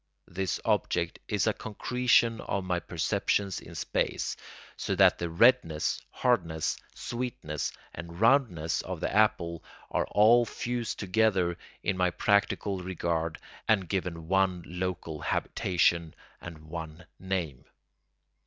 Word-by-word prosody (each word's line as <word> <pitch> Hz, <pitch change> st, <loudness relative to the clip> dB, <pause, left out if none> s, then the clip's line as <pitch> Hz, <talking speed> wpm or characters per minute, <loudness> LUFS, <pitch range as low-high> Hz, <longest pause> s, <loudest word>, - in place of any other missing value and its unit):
This 95 Hz, -1 st, -2 dB
object 85 Hz, -1 st, 0 dB
is 105 Hz, -2 st, +1 dB
a 110 Hz, -, +2 dB
concretion 115 Hz, +1 st, +1 dB
of 100 Hz, -, -2 dB
my 90 Hz, -1 st, 0 dB
perceptions 95 Hz, +2 st, 0 dB
in -, -, -12 dB
space, -, -, -1 dB, 0.4 s
so -, -, -2 dB
that -, -, +5 dB
the 85 Hz, -, -2 dB
redness, 85 Hz, -4 st, +3 dB
hardness, 85 Hz, -11 st, 0 dB, 0.2 s
sweetness, 120 Hz, -, -4 dB, 0.2 s
and 85 Hz, 0 st, -8 dB
roundness 110 Hz, -, +3 dB
of 95 Hz, -2 st, -5 dB
the -, -, -2 dB
apple 85 Hz, -6 st, +2 dB, 0.3 s
are -, -, 0 dB
all 115 Hz, +4 st, +6 dB
fused 120 Hz, 0 st, -3 dB
together 95 Hz, -3 st, +2 dB, 0.3 s
in 95 Hz, -1 st, 0 dB
my 90 Hz, -1 st, +3 dB
practical 100 Hz, 0 st, +1 dB
regard 85 Hz, -3 st, -2 dB, 0.3 s
and 100 Hz, -5 st, +3 dB
given 90 Hz, -4 st, -3 dB
one 95 Hz, -1 st, +2 dB
local 90 Hz, -3 st, -4 dB
habitation 85 Hz, -2 st, +1 dB, 0.3 s
and 85 Hz, -2 st, -8 dB
one 80 Hz, +1 st, -7 dB
name. 90 Hz, -9 st, -3 dB
90 Hz, 120 wpm, -29 LUFS, 85-105 Hz, 0.4 s, all